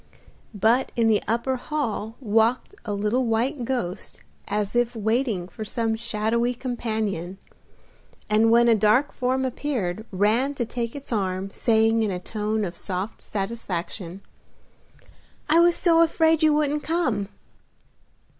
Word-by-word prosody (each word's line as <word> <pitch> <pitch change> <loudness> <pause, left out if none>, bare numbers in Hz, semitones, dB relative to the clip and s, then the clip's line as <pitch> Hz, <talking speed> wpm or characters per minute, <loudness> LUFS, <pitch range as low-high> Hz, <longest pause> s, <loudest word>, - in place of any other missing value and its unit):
But 225 +6 +2
in 230 -2 +2
the 210 -2 +3
upper 235 +4 0
hall 235 -6 -3
walked 225 - +1
a 215 - -3
little 210 +5 0
white 240 +4 0
ghost 225 -7 -4 0.2
as 205 +1 -2
if 240 0 +1
waiting 220 -4 0
for 215 +3 -8
some 225 +1 -1
shadowy 235 +2 -1
companion, 220 -7 -3 0.9
and 215 +2 +3
when 235 +1 +5
a 235 - +6
dark 220 +6 +3
form 260 +1 -1
appeared 235 -8 -2
ran 220 +9 +1
to 240 - -1
take 235 +1 -4
its 280 -3 -6
arm, 190 -2 -2
saying, 225 0 +2
in 215 - +1
a 185 - -2
tone 215 +2 -2
of 175 -1 -6
soft 190 +4 -5
satisfaction, 195 -3 -4 1.3
"I 320 +1 +5
was 345 0 +5
so 335 -2 +4
afraid 325 -1 +3
you 310 -1 +5
wouldn't 295 0 +1
come!" 255 - -1
225 Hz, 135 wpm, -24 LUFS, 210-255 Hz, 1.3 s, a